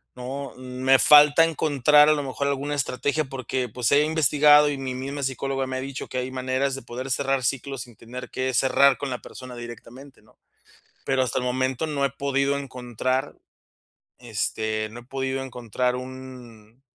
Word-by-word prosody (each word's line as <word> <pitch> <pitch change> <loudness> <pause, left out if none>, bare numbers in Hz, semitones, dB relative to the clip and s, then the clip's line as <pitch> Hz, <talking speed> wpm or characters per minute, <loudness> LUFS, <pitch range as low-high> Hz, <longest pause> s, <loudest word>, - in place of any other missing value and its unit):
¿no? 130 +2 -6
Me 130 +1 +2
falta 150 +1 +7
encontrar 150 -2 +4
a - - +6
lo 145 -1 -2
mejor 140 +1 -3
alguna 140 +1 -2
estrategia, 145 +2 -1
porque, 130 -1 -4
pues, 120 +2 -1
he 145 +1 +5
investigado, 150 -1 +5
y 145 - -3
mi 135 -1 -4
misma 140 +2 -5
psicóloga 135 0 -2
me 130 0 -3
ha - - -3
dicho 135 0 -6
que 130 - -6
hay 125 +1 -4
maneras 130 +1 -1
de 135 - -7
poder 130 +3 -6
cerrar 135 0 0
ciclos 135 0 -2
sin 120 -2 -16
tener 125 +3 -9
que 130 0 -2
cerrar 135 +1 +4
con 140 - -4
la 125 -1 -4
persona 130 -1 -10
directamente, 120 +3 -11
¿no?, - - -26 0.7
pero 135 -1 +2
hasta 130 +1 -1
el 125 - -3
momento 130 +3 -1
no 145 -3 -1
he - - -3
podido 140 0 0
encontrar, 130 0 -3 0.8
este, 110 -1 -3
no 120 +2 -9
he - - -17
podido 135 +1 -3
encontrar 125 -1 -2
un 125 -3 -10
130 Hz, 175 wpm, -24 LUFS, 125-140 Hz, 0.8 s, falta